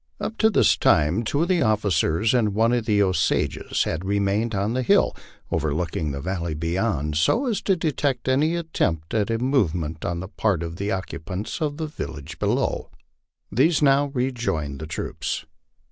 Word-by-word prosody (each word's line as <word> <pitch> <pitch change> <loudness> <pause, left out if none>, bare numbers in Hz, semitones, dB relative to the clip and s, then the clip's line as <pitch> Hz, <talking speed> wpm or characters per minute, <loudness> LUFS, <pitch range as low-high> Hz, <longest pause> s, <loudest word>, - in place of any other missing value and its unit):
Up 220 - -3
to 220 - +5
this 215 - +4
time 80 +9 +3
two 145 +8 0
of - - -1
the 180 -2 +2
offi 110 -3 +2
cers 85 +5 +2
and 110 -5 +2
one 115 +2 +3
of 120 -2 0
the 105 -2 +4
Osages 95 -4 0
had 80 +3 -3
remained 100 +3 0
on 100 +3 0
the 130 - 0
hill 125 - +3 0.4
overlooking 80 +1 -1
the 70 - -4
valley 85 -1 -3
beyond, 80 -2 -1
so 230 - +2
as 230 -5 -1
to 195 - +2
detect 145 -6 -1
any 150 +6 +2
attempt 85 - -2
at 105 -2 +1
a 115 - +1
movement 90 - 0
on 85 0 -2
the 95 - -5
part 100 -4 0
of 85 0 -6
the 100 +2 -2
occu 95 -4 -4
pants 100 - -5
of 145 -2 -1
the 160 - -2
village 75 - -7
below. - - 0 0.6
These 155 +4 +3
now 140 0 +4
rejoined 115 - -2
the 80 - -5
troops. 80 - -4
105 Hz, 180 wpm, -24 LUFS, 85-130 Hz, 0.6 s, to